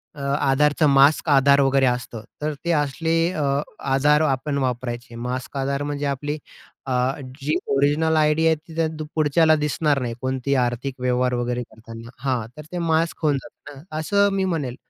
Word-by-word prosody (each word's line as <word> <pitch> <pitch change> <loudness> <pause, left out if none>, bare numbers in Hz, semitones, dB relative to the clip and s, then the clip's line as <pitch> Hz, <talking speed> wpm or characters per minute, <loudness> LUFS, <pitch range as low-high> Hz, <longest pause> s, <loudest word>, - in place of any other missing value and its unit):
अ, 145 - -9 0.2
आधारचा 150 +3 +3
मास्क 140 +3 +4
आधार 140 0 +5
वगैरे 135 0 +3
असतं. 125 -3 -2 0.2
तर 150 +1 -1
ते 170 - +1
असले 160 +2 0 0.2
अ, 155 - -2 0.5
आधार 150 +3 +4
आपण 140 -1 0
वापरायचे. 125 -2 -3
मास्क 125 +3 -5
आधार 140 +1 -1
म्हणजे 145 0 -3
आपली 145 +2 -2 0.5
अ, - - -3 0.5
जी 150 +3 -1
अ, - - -4
ओरिजिनल 145 +4 +2
आयडी 155 +1 +3
आहे 160 - +4
ती 160 +1 -15
त्या 165 -1 +1 0.3
पुढच्याला 155 +1 +4
दिसणार 150 -1 0
नाही. 120 -2 -3
कोणती 130 +1 -1
आर्थिक 125 +2 -3
व्यवहार 125 0 +1
वगैरे 120 0 -2
करताना. 115 +1 -12
हां, 125 -5 -1
तर 150 - -8
ते 180 - -4
मास्क 165 -1 0
खोलतात 145 -4 0 0.3
ना, 135 - -12 0.2
असं 200 +5 +2
मी 195 -1 0
म्हणेल. 150 -9 -2
140 Hz, 170 wpm, -22 LUFS, 125-155 Hz, 0.5 s, आधार